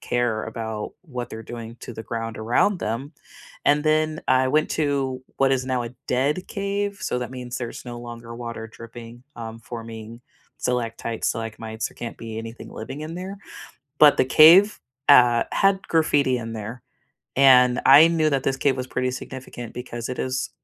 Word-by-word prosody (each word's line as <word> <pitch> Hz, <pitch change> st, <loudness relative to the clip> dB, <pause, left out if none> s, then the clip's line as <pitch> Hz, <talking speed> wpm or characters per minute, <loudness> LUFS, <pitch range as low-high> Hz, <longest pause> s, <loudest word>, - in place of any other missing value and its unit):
care 120 Hz, -3 st, 0 dB
about 110 Hz, -1 st, -5 dB
what 125 Hz, -8 st, -6 dB
they're 110 Hz, 0 st, -7 dB
doing 115 Hz, 0 st, -8 dB
to 120 Hz, -, -8 dB
the 110 Hz, -, -7 dB
ground 115 Hz, -1 st, -5 dB
around 120 Hz, -, +2 dB
them, 130 Hz, +8 st, -3 dB, 0.5 s
and 145 Hz, +1 st, +3 dB
then 155 Hz, 0 st, +1 dB
I 130 Hz, 0 st, +4 dB
went 155 Hz, +3 st, +2 dB
to 135 Hz, -4 st, -1 dB
what 135 Hz, 0 st, +3 dB
is 130 Hz, -1 st, 0 dB
now 130 Hz, -2 st, 0 dB
a 120 Hz, -, -6 dB, 0.2 s
dead 140 Hz, +8 st, 0 dB
cave, 200 Hz, 0 st, -2 dB
so 125 Hz, -, -1 dB
that 125 Hz, -, -4 dB
means 125 Hz, -1 st, -6 dB
there's 120 Hz, -2 st, -6 dB
no 120 Hz, -1 st, -7 dB
longer 120 Hz, -1 st, -9 dB
water 115 Hz, -1 st, -6 dB
dripping, 115 Hz, +1 st, -11 dB
um, 115 Hz, -1 st, -7 dB
forming 115 Hz, -1 st, -8 dB, 0.4 s
stalactites, 115 Hz, -2 st, -2 dB
stalagmites, 110 Hz, 0 st, -4 dB
there -, -, -19 dB
can't 120 Hz, -, -7 dB
be 110 Hz, -1 st, -7 dB
anything 115 Hz, +1 st, -8 dB
living 130 Hz, +6 st, -7 dB
in 155 Hz, +2 st, -6 dB
there, 190 Hz, +3 st, -6 dB, 0.6 s
but 150 Hz, -1 st, +8 dB
the -, -, +5 dB
cave, 170 Hz, +10 st, +7 dB, 0.3 s
uh, 120 Hz, -4 st, +7 dB
had 195 Hz, -1 st, +2 dB
graffiti 145 Hz, -5 st, +2 dB
in 115 Hz, -1 st, -6 dB
there, 115 Hz, +2 st, -6 dB, 0.6 s
and 125 Hz, -2 st, +6 dB
I 145 Hz, +5 st, +9 dB
knew 160 Hz, -2 st, +2 dB
that 135 Hz, -2 st, +1 dB
this 135 Hz, -1 st, +1 dB
cave 135 Hz, -1 st, +2 dB
was 130 Hz, 0 st, -4 dB
pretty 130 Hz, 0 st, -1 dB
significant 130 Hz, -3 st, -8 dB
because 120 Hz, -2 st, -6 dB
it 125 Hz, -, -5 dB
is 130 Hz, +1 st, -2 dB
125 Hz, 175 wpm, -24 LUFS, 115-145 Hz, 0.6 s, I